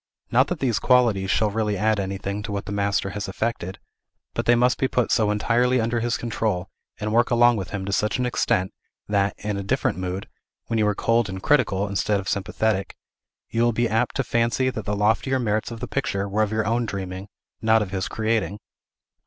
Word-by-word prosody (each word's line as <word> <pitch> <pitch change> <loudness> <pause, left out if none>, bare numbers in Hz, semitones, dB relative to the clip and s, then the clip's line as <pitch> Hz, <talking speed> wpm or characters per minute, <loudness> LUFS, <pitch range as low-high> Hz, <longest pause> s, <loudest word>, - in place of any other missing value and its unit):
Not 130 +4 +4
that 180 - -3
these 120 -7 +1
qualities 115 -7 +3
shall 105 +1 +2
really 105 -1 0
add 110 +1 +2
anything 100 +1 -3
to 105 - -6
what 100 -1 -3
the - - -6
master 100 -1 0
has 100 -1 -4
effected; 95 -1 -3 0.6
but - - -3
they 120 - +6
must 125 +1 +2
be 130 - +2
put 125 -3 0
so 110 -2 +3
entirely 120 +4 +2
under 115 +1 0
his 120 0 0
control, 105 -5 -2 0.3
and 105 0 -2
work 120 +1 +3
along 120 -1 +5
with 95 -3 -4
him 100 -2 -4
to 100 - -3
such 105 +1 +1
an 125 - 0
extent, 95 -6 0 0.3
that, 100 -1 +1
in 105 -1 -3
a - - -2
different 95 -2 0
mood, 95 +1 -4 0.4
when 115 - -1
you 105 - +3
are 105 - +1
cold 115 -1 +1
and 95 0 -6
critical, 105 -9 +2
instead 100 +1 0
of 95 - -7
sympathetic, 100 +1 -1 0.6
you 115 - 0
will 120 0 +3
be 120 +2 +1
apt 115 +2 0
to 135 - +1
fancy 120 +2 +1
that 110 -5 -6
the 105 0 -1
loftier 110 +6 +2
merits 110 -3 0
of 115 -2 -8
the - - -3
picture 100 -8 -1
were 100 +2 0
of 105 -1 +1
your 110 0 0
own 115 +2 0
dreaming, 95 -1 -5 0.3
not 110 -1 +4
of 95 - -8
his 95 -1 -2
creating. 110 -2 -1
105 Hz, 215 wpm, -24 LUFS, 100-120 Hz, 0.6 s, they